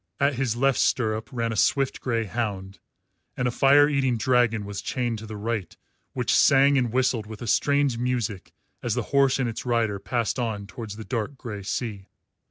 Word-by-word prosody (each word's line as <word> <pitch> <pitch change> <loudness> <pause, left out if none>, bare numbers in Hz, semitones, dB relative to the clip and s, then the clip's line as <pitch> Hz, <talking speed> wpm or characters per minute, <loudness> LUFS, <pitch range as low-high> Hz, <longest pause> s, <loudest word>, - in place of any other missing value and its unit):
At 140 +1 +3
his 125 -3 -1
left 135 +2 +2
stirrup 110 -3 0
ran 115 -3 -2
a - - -4
swift 135 +6 +1
grey 115 -3 0
hound, 100 -3 -4 0.6
and 125 - 0
a - - 0
fire 140 +3 +5
eating 135 -4 +1
dragon 115 -2 +2
was 100 -1 -5
chained 120 -4 -2
to 110 - -9
the 105 0 -7
right 105 -4 -4 0.4
which - - 0
sang 140 +1 +5
and 125 -4 +1
whistled 125 -3 0
with 110 +2 -8
a - - -5
strange 140 +1 +2
music 120 -6 -2 0.3
as - - -1
the - - -1
horse 135 -1 +4
and 130 -2 0
its 115 - -5
rider 115 -5 0
passed 120 +4 -2
on 110 -4 -2
towards 110 -1 -8
the 110 0 -8
dark 125 +2 -3
grey 105 -6 -6
sea. 100 -1 -4
120 Hz, 190 wpm, -25 LUFS, 110-130 Hz, 0.6 s, fire